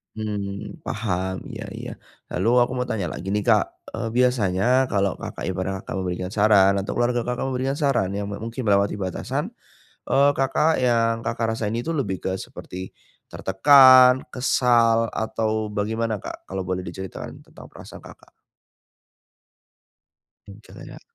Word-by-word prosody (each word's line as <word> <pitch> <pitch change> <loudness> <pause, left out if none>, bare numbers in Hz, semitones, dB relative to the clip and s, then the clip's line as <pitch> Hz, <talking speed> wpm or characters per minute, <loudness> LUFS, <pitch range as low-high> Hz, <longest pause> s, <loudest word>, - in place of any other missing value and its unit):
Mmm, 105 +6 -5
paham, 95 -4 -3 0.2
iya - - -6
iya. - - -7 0.4
Lalu 95 +5 -1 0.2
aku - - -9
mau 125 - 0
tanya 105 -6 -2
lagi 95 +2 -5
nih, 105 0 0
Kak, - - +5 0.3
eee, - - -3
biasanya 115 -7 +1 0.3
kalau 100 -2 +1
Kakak - - -7
ibarat 95 +1 -2
Kakak - - -7
memberikan 90 0 -3
saran 100 -2 +5
atau 100 0 -2
keluarga 120 0 0
Kakak 125 +2 -3
memberikan 135 +2 -2
saran 130 -10 +1
yang 100 0 -3
me 100 - -5
mungkin 115 +1 -5
melewati 100 0 +2
batasan, 95 -2 -4 0.5
eee, 140 +1 +4
Kakak 140 +3 +1
yang 115 -2 +2
Kakak 115 -1 -2
rasain 110 0 -2
itu 120 +8 -2
lebih 105 - -3
ke 95 0 -2
seperti 95 +1 -8 0.4
tertekan, 130 +4 +6
kesal 115 -3 +2
atau 110 -1 -2
bagaimana 110 +2 -2
Kak 100 - -9
kalau 95 0 -4
boleh 90 0 -2
diceritakan 95 +1 -8
tentang - - -14
perasaan - - -12
Kakak? - - -16 2.2
Jengkel 100 +2 -13
ya. - - -11
110 Hz, 145 wpm, -23 LUFS, 95-125 Hz, 2.2 s, tertekan